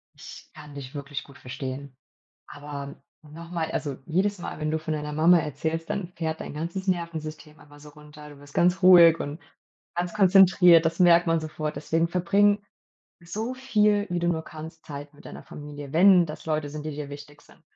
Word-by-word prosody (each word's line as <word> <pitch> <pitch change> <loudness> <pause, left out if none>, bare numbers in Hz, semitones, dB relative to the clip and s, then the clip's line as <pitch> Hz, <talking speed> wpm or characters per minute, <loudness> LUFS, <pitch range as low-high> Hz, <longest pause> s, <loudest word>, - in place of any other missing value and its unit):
Ich - - -12
kann 150 -2 -12
dich 135 -1 -9
wirklich 140 -1 -6
gut 140 - -16
verstehen. 130 +1 -7 0.5
Aber 145 -1 -8 0.3
und 150 -1 -17
noch 165 +2 -10
mal, 165 -2 -3
also, 140 -3 -3
jedes 190 +5 0
Mal, 155 - -7
wenn 155 0 -1
du 160 - 0
von 155 0 -4
deiner 150 -1 -4
Mama 170 +3 +5
erzählst, 160 +2 -3
dann 180 -3 -4
fährt 160 -1 -4
dein - - -8
ganzes 170 +5 -5
Nervensystem 160 -4 -4
immer 145 0 -17
so 150 - -13
runter. 150 0 -14
Du 145 -1 -14
wirst 145 0 -16
ganz 180 +2 +2
ruhig 170 -3 +8
und 145 +4 -6 0.5
ganz 175 0 -2
konzentriert, 185 -3 +6
das 165 +1 -1
merkt 175 -1 +5
man 165 0 +2
sofort. 155 -1 -5
Deswegen 165 +1 0
verbringe 200 +4 +2 0.6
so 215 +9 -5
viel, 210 -5 +1
wie 175 - -1
du 170 0 0
nur 160 -2 -2
kannst, 160 +1 -10
Zeit 145 0 -9
mit 145 - -19
deiner - - -10
Familie. 145 -1 -9
Wenn 180 +1 +6
das 155 0 -9
Leute 155 -2 -2
sind, 150 +1 -8
die 155 - -3
dir 145 -1 -6
wichtig 145 +1 -11
sind, - - -22
160 Hz, 195 wpm, -25 LUFS, 150-175 Hz, 0.6 s, ruhig